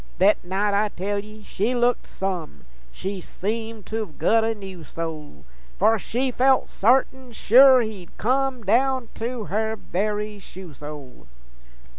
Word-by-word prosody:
Thet 200 Hz, +3 st, +4 dB
night, 195 Hz, +3 st, 0 dB
I 210 Hz, +1 st, +2 dB
tell 200 Hz, +2 st, -3 dB
ye, 215 Hz, +1 st, -11 dB
she 215 Hz, +5 st, -1 dB
looked 245 Hz, 0 st, +1 dB
some! 175 Hz, -, -5 dB, 0.3 s
She 195 Hz, -, -5 dB
seemed 220 Hz, +3 st, -5 dB
to've 215 Hz, -7 st, -5 dB
gut 225 Hz, 0 st, +3 dB
a 225 Hz, 0 st, 0 dB
new 190 Hz, -4 st, -9 dB
soul, 155 Hz, -, -7 dB, 0.3 s
For 220 Hz, +2 st, +3 dB
she 255 Hz, +6 st, -1 dB
felt 260 Hz, +2 st, +3 dB
sartin 255 Hz, +2 st, +1 dB
sure 255 Hz, +4 st, +7 dB
he'd 210 Hz, -6 st, -7 dB
come, 260 Hz, +1 st, 0 dB
Down 250 Hz, +3 st, +2 dB
to 235 Hz, 0 st, -4 dB
her 220 Hz, +5 st, -1 dB
very 210 Hz, +1 st, -3 dB
shoe 185 Hz, -4 st, -11 dB
sole. 145 Hz, -2 st, -10 dB
215 Hz, 140 wpm, -24 LUFS, 190-235 Hz, 0.3 s, sure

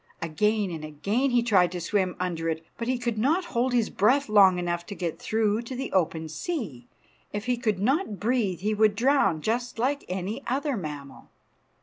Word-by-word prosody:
Again 205 Hz, +5 st, 0 dB
and 160 Hz, -2 st, -6 dB
again 200 Hz, -, -1 dB
he 245 Hz, -2 st, +2 dB
tried 185 Hz, -7 st, +4 dB
to 180 Hz, -, -3 dB
swim 185 Hz, +1 st, 0 dB
under 170 Hz, -2 st, -2 dB
it, 160 Hz, 0 st, -3 dB
but 230 Hz, -, -5 dB
he 255 Hz, 0 st, +1 dB
could 235 Hz, -3 st, -2 dB
not 320 Hz, -, +2 dB
hold 245 Hz, +2 st, +1 dB
his 240 Hz, -3 st, +1 dB
breath 255 Hz, +6 st, +2 dB
long 195 Hz, -3 st, +6 dB
enough 175 Hz, -1 st, -2 dB
to 200 Hz, -, -6 dB
get 170 Hz, -4 st, -4 dB
through 220 Hz, 0 st, 0 dB
to 240 Hz, +2 st, -7 dB
the 265 Hz, +2 st, -4 dB
open 160 Hz, -3 st, 0 dB
sea. 160 Hz, -, -5 dB, 0.4 s
If 205 Hz, 0 st, -4 dB
he 250 Hz, 0 st, +1 dB
could 220 Hz, -5 st, -1 dB
not 230 Hz, -, 0 dB
breathe 210 Hz, -6 st, 0 dB
he 210 Hz, +2 st, 0 dB
would 215 Hz, -1 st, +3 dB
drown, 220 Hz, -, +2 dB
just 240 Hz, +2 st, -1 dB
like 275 Hz, +5 st, 0 dB
any 190 Hz, +7 st, -3 dB
other 280 Hz, +2 st, 0 dB
mammal. 150 Hz, -7 st, -7 dB
210 Hz, 195 wpm, -26 LUFS, 180-245 Hz, 0.4 s, long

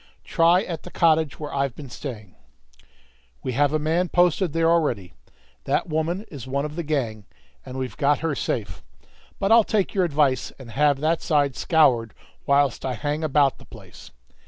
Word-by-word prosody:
"Try 170 Hz, +3 st, +3 dB
at 165 Hz, -6 st, -5 dB
the -, -, -10 dB
cottage 160 Hz, -3 st, +2 dB
where 150 Hz, -1 st, -6 dB
I've 140 Hz, -2 st, -1 dB
been 140 Hz, -4 st, -10 dB
staying." 110 Hz, -10 st, -8 dB, 1.1 s
"We -, -, -2 dB
have 145 Hz, +3 st, +2 dB
a 155 Hz, -, +1 dB
man 165 Hz, +4 st, 0 dB
posted 175 Hz, 0 st, +2 dB
there 165 Hz, +1 st, +1 dB
already. 145 Hz, -, +1 dB, 0.5 s
That -, -, 0 dB
woman 165 Hz, +6 st, -2 dB
is 135 Hz, -6 st, -8 dB
one 140 Hz, +2 st, -1 dB
of 150 Hz, 0 st, -6 dB
the 170 Hz, -, -2 dB
gang, 125 Hz, -10 st, -2 dB, 0.4 s
and 130 Hz, 0 st, -8 dB
we've 130 Hz, -1 st, -4 dB
got 145 Hz, -1 st, +2 dB
her 160 Hz, -, 0 dB
safe. 105 Hz, -, -3 dB, 0.6 s
But 195 Hz, +2 st, 0 dB
I'll 230 Hz, 0 st, +7 dB
take 210 Hz, -2 st, -1 dB
your 190 Hz, -, +2 dB
advice, 145 Hz, -6 st, +1 dB
and 125 Hz, -4 st, -11 dB
have 145 Hz, +3 st, +2 dB
that 160 Hz, +2 st, +1 dB
side 145 Hz, -3 st, +1 dB
scoured 125 Hz, -, +2 dB, 0.3 s
whilst 140 Hz, -1 st, +2 dB
I 130 Hz, -2 st, -2 dB
hang 150 Hz, +1 st, -3 dB
about 145 Hz, -2 st, +2 dB
the -, -, -15 dB
place." -, -, -14 dB
150 Hz, 180 wpm, -23 LUFS, 130-165 Hz, 1.1 s, I'll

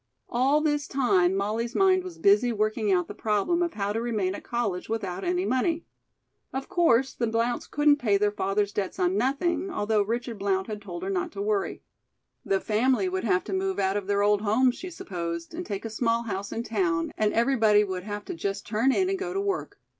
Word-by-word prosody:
All 270 Hz, +5 st, +2 dB
this 295 Hz, -2 st, 0 dB
time 190 Hz, -9 st, +2 dB
Molly's 220 Hz, +5 st, -2 dB
mind 375 Hz, -1 st, +4 dB
was 365 Hz, -2 st, -8 dB
busy 210 Hz, +5 st, +4 dB
working 215 Hz, -1 st, 0 dB
out 180 Hz, -2 st, +2 dB
the -, -, -7 dB
problem 220 Hz, -, 0 dB
of 340 Hz, -1 st, -1 dB
how 200 Hz, -1 st, -1 dB
to 225 Hz, -, -1 dB
remain 215 Hz, -6 st, -1 dB
at -, -, -8 dB
college 215 Hz, -7 st, -2 dB
without 200 Hz, -5 st, -3 dB
any 360 Hz, +1 st, 0 dB
money. 325 Hz, +5 st, 0 dB, 0.7 s
Of 265 Hz, +1 st, -4 dB
course, 270 Hz, -7 st, +3 dB
the 235 Hz, -, -1 dB
Blounts 230 Hz, +2 st, -1 dB
couldn't 295 Hz, 0 st, +4 dB
pay 215 Hz, -7 st, +2 dB
their 205 Hz, +1 st, +2 dB
father's 205 Hz, 0 st, -1 dB
debts 195 Hz, -2 st, -3 dB
on 180 Hz, +1 st, +1 dB
nothing, 300 Hz, -, 0 dB
although 215 Hz, -, +1 dB
Richard 230 Hz, +1 st, -3 dB
Blount 190 Hz, -1 st, 0 dB
had 210 Hz, -1 st, -6 dB
told 175 Hz, -3 st, -7 dB
her 195 Hz, -, -2 dB
not 180 Hz, -2 st, -1 dB
to 200 Hz, -, -5 dB
worry. 210 Hz, -1 st, -1 dB, 0.6 s
The 195 Hz, -, +1 dB
family 255 Hz, -, +1 dB
would 375 Hz, -5 st, -2 dB
have 185 Hz, -4 st, +2 dB
to 200 Hz, -, -5 dB
move 190 Hz, 0 st, -1 dB
out 195 Hz, 0 st, +1 dB
of 205 Hz, -2 st, -2 dB
their 200 Hz, 0 st, +2 dB
old 205 Hz, 0 st, +3 dB
home, 225 Hz, +5 st, +3 dB
she 365 Hz, +9 st, -8 dB
supposed, 170 Hz, -, -5 dB
and 350 Hz, +2 st, -5 dB
take 200 Hz, +2 st, -4 dB
a -, -, -3 dB
small 230 Hz, +1 st, +1 dB
house 200 Hz, -3 st, -4 dB
in 230 Hz, -, -3 dB
town, 180 Hz, -8 st, 0 dB
and 215 Hz, -1 st, +1 dB
everybody 225 Hz, -4 st, +4 dB
would 190 Hz, -2 st, -3 dB
have 205 Hz, +1 st, -6 dB
to -, -, -5 dB
just 195 Hz, +3 st, -3 dB
turn 225 Hz, +5 st, +2 dB
in 370 Hz, +7 st, +2 dB
and 385 Hz, 0 st, -1 dB
go 375 Hz, -1 st, -4 dB
to -, -, +1 dB
work. 395 Hz, -1 st, -3 dB
215 Hz, 215 wpm, -27 LUFS, 200-265 Hz, 0.7 s, mind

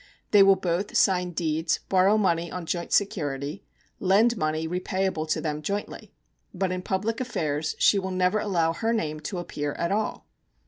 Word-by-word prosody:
They 205 Hz, -, +7 dB
will 195 Hz, 0 st, +7 dB
both 180 Hz, +2 st, -1 dB
sign 180 Hz, -2 st, +3 dB
deeds, 160 Hz, -1 st, -1 dB
borrow 190 Hz, +3 st, +4 dB
money 170 Hz, -5 st, +1 dB
on 180 Hz, -2 st, -5 dB
joint 170 Hz, +1 st, -3 dB
security, 145 Hz, -5 st, -1 dB, 0.4 s
lend 210 Hz, +6 st, +3 dB
money 155 Hz, -3 st, -1 dB
repayable 180 Hz, -2 st, -2 dB
to -, -, +1 dB
them 150 Hz, -1 st, -3 dB
jointly. 200 Hz, +7 st, -5 dB, 0.4 s
But 185 Hz, 0 st, -1 dB
in 185 Hz, 0 st, -2 dB
public 210 Hz, +6 st, -2 dB
affairs 155 Hz, -, -2 dB
she 200 Hz, -, +4 dB
will 190 Hz, 0 st, -4 dB
never 185 Hz, +2 st, +1 dB
allow 170 Hz, -6 st, +1 dB
her 225 Hz, +7 st, -1 dB
name 155 Hz, -9 st, -2 dB
to 165 Hz, +5 st, -5 dB
appear 145 Hz, -4 st, -4 dB
at 170 Hz, -, -2 dB
all. 210 Hz, +1 st, -2 dB
180 Hz, 170 wpm, -26 LUFS, 160-195 Hz, 0.4 s, They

